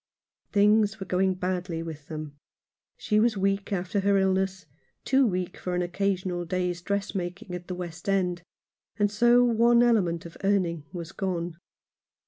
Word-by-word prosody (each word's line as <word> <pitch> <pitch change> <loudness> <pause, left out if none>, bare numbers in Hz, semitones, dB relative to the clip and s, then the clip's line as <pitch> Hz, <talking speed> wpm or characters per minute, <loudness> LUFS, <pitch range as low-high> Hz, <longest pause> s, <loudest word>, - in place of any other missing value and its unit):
Things 210 +1 +3
were 190 - -5
going 185 +1 +1
badly 180 -2 -2
with 155 -3 -8
them. 155 -2 -6 0.6
She 210 -1 +1
was 225 -1 +2
weak 195 +1 0
after 190 +1 -1
her 200 0 +3
illness 190 -1 0 0.2
— - - -44
too 270 -1 +4
weak 180 -3 -2
for 180 -1 -3
an 180 - +1
occasional 180 -1 -1
day's 180 0 -2
dressmaking 195 0 -3
at 180 0 -6
the 180 - -4
West 175 +1 -6
End, 180 -3 +1 0.6
and 205 -1 +2
so 240 +3 +5
one 235 0 +4
element 180 -9 +2
of 170 - -10
earning 180 -6 +1
was 170 -2 -6
gone. 175 -4 -3
185 Hz, 155 wpm, -27 LUFS, 175-200 Hz, 0.6 s, so